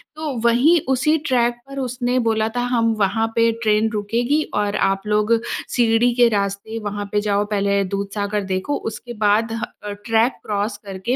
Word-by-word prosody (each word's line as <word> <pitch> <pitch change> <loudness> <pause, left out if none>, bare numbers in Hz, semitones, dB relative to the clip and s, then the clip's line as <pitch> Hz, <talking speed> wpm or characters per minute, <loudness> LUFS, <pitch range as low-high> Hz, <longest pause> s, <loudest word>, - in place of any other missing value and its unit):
तो 310 -2 -4
वहीं 255 +9 +4
उसी 270 +4 +2
ट्रैक 240 -2 +2
पर 275 0 -7
उसने 250 -1 -1
बोला 220 -1 +1
था 245 - 0
हम 230 -2 +2
वहाँ 210 +3 +1
पे 230 0 +4
ट्रेन 215 0 +3
रुकेगी 235 +7 0
और 205 0 0
आप 195 0 +1
लोग 210 +1 +2 0.4
सीढ़ी 235 0 +3
के 240 -1 +5
रास्ते 200 +1 -2
वहाँ 205 0 -3
पे 210 - +2
जाओ। 205 -1 +1
पहले 200 -1 +1
दूधसागर 200 +2 -2
देखो 190 +9 -2
उसके 240 +2 -8
बाद 215 +1 +2
ह 230 0 -4 0.2
अ, 205 - -5
ट्रैक 230 +2 +3
क्रॉस 205 0 -2
करके 195 +6 -3
220 Hz, 170 wpm, -21 LUFS, 205-240 Hz, 0.4 s, के